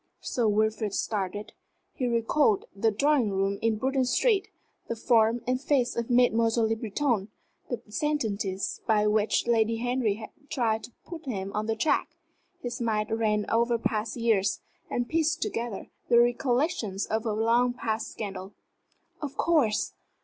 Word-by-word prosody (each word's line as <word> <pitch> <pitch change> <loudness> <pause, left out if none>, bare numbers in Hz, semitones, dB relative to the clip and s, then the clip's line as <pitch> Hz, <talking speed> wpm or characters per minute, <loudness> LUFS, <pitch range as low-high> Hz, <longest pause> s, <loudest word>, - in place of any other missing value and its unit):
Sir 240 -4 0
Wilfrid 215 -1 +1
started. 205 -1 -3 0.4
He 255 - -2
recalled 230 -1 +2
the 220 +3 +2
drawing 265 +1 +2
room 195 0 0
in 225 -1 +2
Bruton 265 +3 +1
Street; 410 - +2 0.4
the 230 - -2
form 230 0 +3
and 255 +1 0
face 270 -4 +1
of 235 0 -2
Mademoiselle 230 -2 +3
Le 225 - +1
Breton; 225 -1 -1 0.4
the 245 - -2
sentences 220 - -2
by 210 -2 +3
which 210 0 +2
Lady 230 -1 +2
Henry 245 -3 0
had 215 0 -9 0.2
tried 220 -4 0
to - - -15
put 335 -2 -8
him 195 -5 -3
on 210 +1 -2
the 225 - 0
track. 265 +8 0 0.5
His 245 +1 -4
mind 215 -1 0
ran 215 -2 +1
over 235 +1 +2
past 220 -1 -2
years, 215 -4 +2 0.3
and 245 0 -1
pieced 320 +1 +1
together 235 - -4 0.2
the 235 - +6
recollections 240 - +1
of 220 +1 -1
a 220 -3 -1
long 230 +3 +3
past 225 -3 -2
scandal. 195 -2 -6 0.7
"Of 290 -3 -5
course! 290 -11 +2
230 Hz, 150 wpm, -28 LUFS, 215-245 Hz, 0.7 s, the